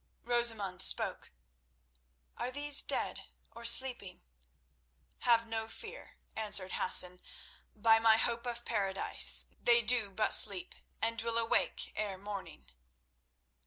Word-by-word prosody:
Rosamund 225 Hz, -6 st, -2 dB
spoke. -, -, 0 dB, 1.0 s
"Are -, -, -7 dB
these 290 Hz, +1 st, +3 dB
dead -, -, -4 dB, 0.3 s
or 235 Hz, +1 st, -15 dB
sleeping?" 235 Hz, -6 st, +1 dB, 1.0 s
"Have 230 Hz, -2 st, -1 dB
no 225 Hz, -1 st, -7 dB
fear," 450 Hz, -, -14 dB, 0.2 s
answered 205 Hz, -4 st, -3 dB
Hassan. 180 Hz, 0 st, +2 dB, 0.5 s
"By 225 Hz, +1 st, +1 dB
my 225 Hz, -1 st, +1 dB
hope 235 Hz, +1 st, -5 dB
of 240 Hz, 0 st, -9 dB
paradise, 195 Hz, -4 st, +1 dB, 0.2 s
they 235 Hz, 0 st, +2 dB
do 230 Hz, -2 st, 0 dB
but 215 Hz, +3 st, -1 dB
sleep, 185 Hz, -3 st, +7 dB, 0.3 s
and 230 Hz, 0 st, -4 dB
will 230 Hz, 0 st, -5 dB
awake 230 Hz, 0 st, -3 dB
ere 205 Hz, -3 st, -6 dB
morning." 200 Hz, 0 st, -12 dB
225 Hz, 115 wpm, -29 LUFS, 200-235 Hz, 1.0 s, sleep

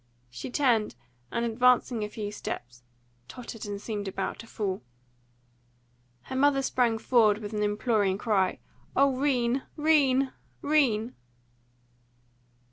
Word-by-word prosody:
She 125 Hz, -, -6 dB
turned, 245 Hz, -5 st, +2 dB, 0.4 s
and, 235 Hz, 0 st, -1 dB
advancing 240 Hz, 0 st, +3 dB
a 210 Hz, -, -3 dB
few 210 Hz, -1 st, -5 dB
steps, 120 Hz, -, -6 dB, 0.5 s
tottered 225 Hz, -, -8 dB
and 205 Hz, -1 st, -4 dB
seemed 205 Hz, -1 st, -4 dB
about 190 Hz, 0 st, -3 dB
to 230 Hz, -, -10 dB
fall. 195 Hz, -4 st, -3 dB, 1.4 s
Her 260 Hz, -, -7 dB
mother 275 Hz, 0 st, +3 dB
sprang 240 Hz, -4 st, +1 dB
forward 220 Hz, -3 st, +3 dB
with 210 Hz, 0 st, -7 dB
an 210 Hz, -, -1 dB
imploring 210 Hz, -2 st, +1 dB
cry, 200 Hz, -4 st, +1 dB, 0.4 s
"O 275 Hz, 0 st, +4 dB
'Rene, 255 Hz, -2 st, +1 dB, 0.2 s
'Rene, 280 Hz, -4 st, +3 dB, 0.3 s
'Rene!" 255 Hz, -7 st, +2 dB
230 Hz, 120 wpm, -28 LUFS, 210-260 Hz, 1.4 s, O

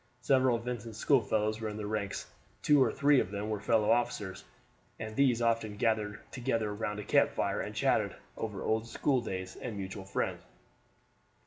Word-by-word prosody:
Several 130 Hz, 0 st, +4 dB
of 115 Hz, -, -4 dB
Vincent's 115 Hz, -3 st, -5 dB
schoolfellows 110 Hz, -4 st, +2 dB
were 110 Hz, -, -2 dB
in 105 Hz, -, -6 dB
the 105 Hz, -, -4 dB
ranks; 105 Hz, -1 st, -3 dB, 0.4 s
two 145 Hz, -2 st, +5 dB
or -, -, +1 dB
three 140 Hz, -1 st, +4 dB
of -, -, -1 dB
them 105 Hz, +2 st, -3 dB
were 105 Hz, -, -1 dB
fellow 110 Hz, +1 st, +2 dB
officers, 105 Hz, -5 st, 0 dB, 0.5 s
and 110 Hz, -1 st, -6 dB
these 125 Hz, -3 st, +3 dB
often 115 Hz, -3 st, 0 dB
gathered 105 Hz, -2 st, 0 dB
together 115 Hz, -5 st, -1 dB
round 105 Hz, 0 st, -3 dB
a -, -, -4 dB
camp -, -, +4 dB
fire -, -, 0 dB
and -, -, -5 dB
chatted -, -, +1 dB, 0.2 s
over 105 Hz, -3 st, -4 dB
old 110 Hz, +1 st, 0 dB
schooldays 110 Hz, -9 st, -1 dB
and 115 Hz, -5 st, -5 dB
mutual 95 Hz, 0 st, -6 dB
friends. 95 Hz, -, -2 dB
110 Hz, 175 wpm, -31 LUFS, 105-120 Hz, 0.5 s, two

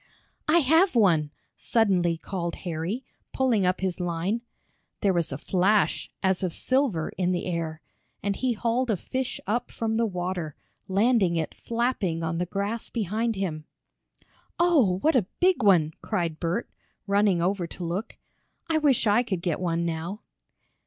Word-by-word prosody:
"I 315 Hz, +2 st, +5 dB
have 320 Hz, +5 st, +4 dB
one!" 170 Hz, -9 st, +4 dB, 0.3 s
suddenly 185 Hz, -7 st, +2 dB
called 170 Hz, 0 st, -4 dB
Harry, 175 Hz, +9 st, -3 dB, 0.3 s
pulling 235 Hz, -8 st, +2 dB
up 185 Hz, +1 st, 0 dB
his 190 Hz, -2 st, -1 dB
line. 175 Hz, +6 st, -1 dB, 0.6 s
There 195 Hz, -2 st, +3 dB
was 170 Hz, -4 st, 0 dB
a 135 Hz, -, -3 dB
flash, 195 Hz, +6 st, +1 dB
as 190 Hz, -1 st, +2 dB
of 180 Hz, -3 st, -1 dB
silver, 255 Hz, -, +1 dB
in 180 Hz, 0 st, +2 dB
the 175 Hz, -, -2 dB
air, 165 Hz, -3 st, -3 dB, 0.4 s
and 200 Hz, 0 st, 0 dB
he 255 Hz, +2 st, 0 dB
hauled 235 Hz, +3 st, 0 dB
a 215 Hz, -, +2 dB
fish 260 Hz, +7 st, -3 dB
up 225 Hz, +5 st, -1 dB
from 225 Hz, -1 st, -2 dB
the 230 Hz, 0 st, +2 dB
water, 180 Hz, -5 st, -3 dB, 0.3 s
landing 200 Hz, -2 st, +3 dB
it 160 Hz, -2 st, -2 dB
flapping 230 Hz, -8 st, -1 dB
on 165 Hz, +1 st, -1 dB
the 180 Hz, -, -1 dB
grass 205 Hz, +5 st, -3 dB
behind 225 Hz, +1 st, -1 dB
him. 165 Hz, -6 st, -3 dB, 0.9 s
"Oh, 290 Hz, -, +4 dB
what 315 Hz, -1 st, +4 dB
a 215 Hz, -8 st, +3 dB
big 365 Hz, -5 st, +3 dB
one!" 175 Hz, -7 st, +4 dB
cried 170 Hz, -7 st, -2 dB
Bert, 175 Hz, +7 st, -1 dB, 0.4 s
running 200 Hz, -2 st, +3 dB
over 180 Hz, 0 st, 0 dB
to 175 Hz, -, -7 dB
look. 180 Hz, +6 st, -4 dB, 0.5 s
"I 320 Hz, -1 st, +2 dB
wish 280 Hz, -6 st, +3 dB
I 210 Hz, +2 st, +4 dB
could 190 Hz, -8 st, -3 dB
get 175 Hz, -4 st, 0 dB
one 170 Hz, -2 st, 0 dB
now." 170 Hz, +5 st, -4 dB
195 Hz, 160 wpm, -26 LUFS, 170-230 Hz, 0.9 s, I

